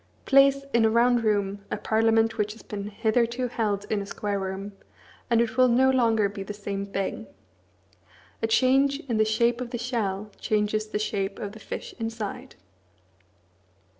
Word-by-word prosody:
Place 275 Hz, 0 st, +5 dB
in 235 Hz, -1 st, +4 dB
a 220 Hz, -, +5 dB
round 240 Hz, +1 st, +3 dB
room 200 Hz, -2 st, 0 dB
a -, -, -2 dB
parliament 225 Hz, 0 st, +2 dB
which 210 Hz, 0 st, 0 dB
has 225 Hz, -, -15 dB
been 205 Hz, -1 st, -6 dB
hitherto 235 Hz, +3 st, 0 dB
held 205 Hz, -4 st, -1 dB
in 210 Hz, -2 st, +1 dB
a -, -, -5 dB
square 205 Hz, 0 st, -3 dB
room, 190 Hz, +1 st, -5 dB, 0.6 s
and 235 Hz, -1 st, +3 dB
it 235 Hz, +1 st, -2 dB
will 255 Hz, 0 st, +6 dB
no 260 Hz, +2 st, +4 dB
longer 225 Hz, -5 st, +3 dB
be 200 Hz, 0 st, -7 dB
the 205 Hz, +2 st, -6 dB
same 200 Hz, -1 st, -4 dB
thing. 195 Hz, -1 st, -3 dB, 1.1 s
A 225 Hz, -, +1 dB
change 270 Hz, +4 st, +3 dB
in 240 Hz, -7 st, -2 dB
the 215 Hz, -, +4 dB
shape 235 Hz, +3 st, +1 dB
of 245 Hz, -, -4 dB
the 240 Hz, -, -4 dB
shell 215 Hz, -4 st, -3 dB
changes 215 Hz, 0 st, 0 dB
the 215 Hz, -, -3 dB
shape 200 Hz, -2 st, -2 dB
of 205 Hz, -, -5 dB
the 220 Hz, -, -12 dB
fish -, -, -7 dB
inside. 225 Hz, -2 st, -5 dB
220 Hz, 170 wpm, -26 LUFS, 205-235 Hz, 1.1 s, will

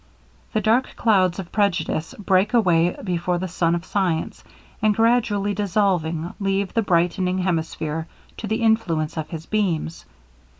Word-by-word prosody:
The 215 Hz, -, +1 dB
dark 225 Hz, +5 st, +1 dB
clouds 190 Hz, -6 st, +2 dB
of 185 Hz, -3 st, -7 dB
prejudice 180 Hz, -1 st, 0 dB
break 195 Hz, +2 st, +2 dB
away 175 Hz, -6 st, +3 dB
before 180 Hz, -1 st, -1 dB
the 185 Hz, +2 st, -3 dB
sun 170 Hz, -1 st, +1 dB
of 170 Hz, +1 st, -5 dB
science, 180 Hz, -6 st, -1 dB, 0.4 s
and 215 Hz, -1 st, +3 dB
gradually 220 Hz, -3 st, +2 dB
dissolving, 180 Hz, -5 st, 0 dB
leave 195 Hz, -1 st, -1 dB
the 230 Hz, -, +2 dB
brightening 180 Hz, 0 st, +1 dB
hemisphere 160 Hz, -3 st, -2 dB, 0.3 s
to 220 Hz, -, -5 dB
the 220 Hz, +2 st, -1 dB
influence 175 Hz, -9 st, +1 dB
of 155 Hz, -2 st, -4 dB
his 165 Hz, -1 st, -7 dB
beams. 175 Hz, -6 st, -2 dB
185 Hz, 140 wpm, -22 LUFS, 170-210 Hz, 0.4 s, away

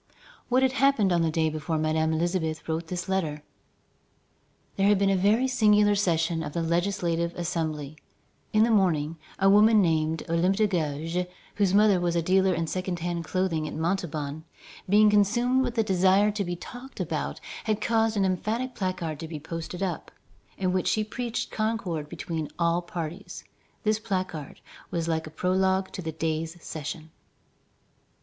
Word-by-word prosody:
What 255 Hz, +1 st, +3 dB
had 260 Hz, -, +3 dB
happened 260 Hz, -8 st, +3 dB
on 170 Hz, -, +2 dB
the 165 Hz, -, +2 dB
day 160 Hz, 0 st, +1 dB
before 155 Hz, +1 st, -2 dB
Madame 160 Hz, +1 st, +1 dB
Elisabeth 160 Hz, -1 st, -1 dB
wrote 165 Hz, +1 st, -2 dB
this 175 Hz, 0 st, -4 dB
letter? 160 Hz, -6 st, -1 dB, 1.3 s
There 195 Hz, 0 st, +2 dB
had 205 Hz, 0 st, +5 dB
been 195 Hz, 0 st, +2 dB
a -, -, +3 dB
very 210 Hz, +7 st, +3 dB
singular 210 Hz, -5 st, +4 dB
session 170 Hz, -4 st, +1 dB
of 150 Hz, -2 st, -5 dB
the 170 Hz, -, -1 dB
Legislative 170 Hz, 0 st, 0 dB
Assembly. 155 Hz, -4 st, -3 dB, 0.6 s
In 215 Hz, 0 st, +4 dB
the 235 Hz, -, +3 dB
morning, 165 Hz, -6 st, +2 dB, 0.2 s
a 195 Hz, -, +3 dB
woman 210 Hz, +2 st, +6 dB
named 160 Hz, -3 st, +1 dB
Olympe 170 Hz, +3 st, +2 dB
de 215 Hz, +1 st, +3 dB
Gouges, 165 Hz, -1 st, -1 dB, 0.3 s
whose 200 Hz, -2 st, +2 dB
mother 205 Hz, -2 st, +5 dB
was 175 Hz, -1 st, 0 dB
a 170 Hz, -, +2 dB
dealer 190 Hz, +2 st, +3 dB
in 165 Hz, -2 st, 0 dB
second 185 Hz, +1 st, -3 dB
hand 170 Hz, 0 st, -3 dB
clothing 170 Hz, -4 st, -1 dB
at -, -, -6 dB
Montauban, 160 Hz, -3 st, -2 dB, 0.5 s
being 210 Hz, +1 st, +6 dB
consumed 240 Hz, +6 st, +3 dB
with 245 Hz, -2 st, -3 dB
a 225 Hz, -, +4 dB
desire 190 Hz, +1 st, +3 dB
to 205 Hz, -1 st, -2 dB
be 175 Hz, -1 st, -3 dB
talked 245 Hz, +9 st, -10 dB
about, -, -, -3 dB, 0.3 s
had 215 Hz, -1 st, 0 dB
caused 225 Hz, -1 st, +1 dB
an 195 Hz, -, +3 dB
emphatic 220 Hz, +7 st, -1 dB
placard 175 Hz, -5 st, -3 dB
to 160 Hz, -, -6 dB
be 155 Hz, -2 st, -6 dB
posted 165 Hz, +4 st, -5 dB
up, 180 Hz, -4 st, -3 dB, 0.5 s
in 185 Hz, -1 st, 0 dB
which 185 Hz, -1 st, 0 dB
she 215 Hz, -, +2 dB
preached 235 Hz, +2 st, -4 dB
concord 200 Hz, -9 st, -2 dB
between 160 Hz, -2 st, -4 dB
all 170 Hz, 0 st, +2 dB
parties. 175 Hz, +1 st, -6 dB, 0.4 s
This 215 Hz, -1 st, +2 dB
placard 185 Hz, -9 st, -4 dB, 0.3 s
was 170 Hz, -1 st, -2 dB
like 160 Hz, -1 st, -1 dB
a -, -, -7 dB
prologue 190 Hz, +3 st, +1 dB
to 185 Hz, -, -6 dB
the 160 Hz, -2 st, -4 dB
day's 160 Hz, +1 st, -3 dB
session. 160 Hz, 0 st, -7 dB
180 Hz, 170 wpm, -27 LUFS, 160-205 Hz, 1.3 s, woman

